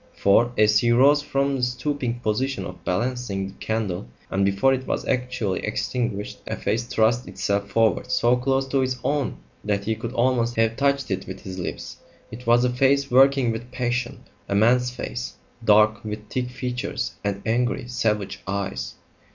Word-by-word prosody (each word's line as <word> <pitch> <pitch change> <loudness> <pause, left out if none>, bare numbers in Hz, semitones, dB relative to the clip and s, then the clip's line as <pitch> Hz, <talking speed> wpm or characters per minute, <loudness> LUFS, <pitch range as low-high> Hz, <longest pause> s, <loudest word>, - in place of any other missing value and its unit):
For, 115 +5 +4
as 105 -1 +5
he 120 - +1
rose 140 +5 +5
from 140 -1 0
the - - -3
stooping 125 -1 -2
position 130 +5 -1
of 90 - -9
balancing 105 -1 -2
the - - -12
candle, 105 - -2 0.2
and 100 +1 +1
before 100 +7 +3
it 130 0 -3
was - - -2
actually 125 -7 -1
extinguished, 115 -5 -2
a - - -2
face 115 +3 -1
thrust 120 0 +1
itself 100 +2 -2
forward 115 0 +2
so 120 +1 +3
close 135 +2 0
to 135 - +1
his 130 -1 0
own 145 -1 -1 0.3
that 100 -1 -1
he 110 +2 0
could 115 +2 -6
almost 120 -1 +1
have 115 0 +2
touched 140 -2 +1
it 95 0 -2
with 95 - -7
his 95 -2 -7
lips. 90 - -5 0.3
It 120 +2 -10
was 120 +1 +5
a 125 - +1
face 140 +2 +2
working 135 -1 +5
with 120 +2 -6
passion; 120 0 -2 0.3
a 100 - 0
man's 125 +4 +4
face, 125 0 -5 0.3
dark, 110 0 +4
with 105 -1 -6
thick 125 -1 -2
features, 125 0 -3
and 100 -1 -2
angry, 120 +2 0
savage 105 -5 -1
eyes. 95 -10 -3
120 Hz, 175 wpm, -24 LUFS, 105-125 Hz, 0.3 s, as